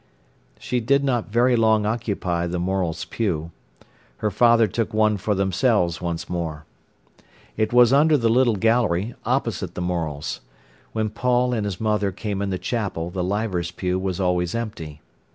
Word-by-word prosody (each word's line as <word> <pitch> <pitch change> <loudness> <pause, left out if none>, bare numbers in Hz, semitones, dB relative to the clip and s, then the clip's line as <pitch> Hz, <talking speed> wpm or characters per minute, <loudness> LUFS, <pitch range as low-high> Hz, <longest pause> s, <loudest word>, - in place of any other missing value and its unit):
She 125 - -2
did 140 +4 +2
not 125 -5 0
very 120 +3 +3
long 110 -2 +3
occupy 100 -6 -1
the 90 +1 -3
Morels' 90 -2 -1
pew. 85 -8 -2 0.7
Her 105 - -1
father 115 +2 +5
took 110 +2 -2
one 110 -1 +3
for 105 +2 -1
themselves 95 -2 +1
once 85 -1 -3
more. 80 -3 -4 0.9
It 110 0 0
was 120 +1 +6
under 150 +2 +5
the 115 -4 +1
little 120 0 +3
gallery, 110 -1 +1
opposite - - -1
the - - -4
Morels'. 80 -5 -3 0.5
When 110 -1 -1
Paul 125 +2 +1
and 110 -3 -1
his 100 -3 -4
mother 105 -2 0
came 100 +1 -4
in 100 - -1
the 95 - -1
chapel 90 -4 -3
the 90 -1 -2
Leivers's 95 -3 -1
pew 90 +1 -2
was 95 0 -3
always 90 0 0
empty. 85 -10 -5
105 Hz, 160 wpm, -23 LUFS, 90-115 Hz, 0.9 s, was